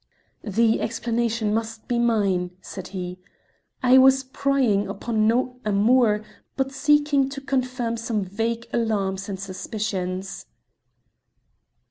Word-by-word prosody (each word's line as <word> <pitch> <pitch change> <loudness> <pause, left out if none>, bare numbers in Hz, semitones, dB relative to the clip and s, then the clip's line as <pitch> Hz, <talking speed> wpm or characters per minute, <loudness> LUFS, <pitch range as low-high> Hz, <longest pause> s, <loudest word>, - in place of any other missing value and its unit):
"The 225 +2 +2
explanation 230 -2 -1
must 225 0 -3
be 240 -1 0
mine," 195 -6 +1
said 190 -1 -8
he. 180 -1 -6 0.6
"I 255 +1 +7
was 265 0 +6
prying 260 -6 +1
upon 215 +1 0
no 250 +2 +1
amour, 215 +1 +3 0.3
but 270 0 0
seeking 290 -1 +2
to 275 0 -6
confirm 255 -3 -2
some 225 -2 -2
vague 225 +4 -2
alarms 200 -4 -1
and 190 -1 -4
suspicions." 195 -1 -4
225 Hz, 110 wpm, -24 LUFS, 200-250 Hz, 0.6 s, I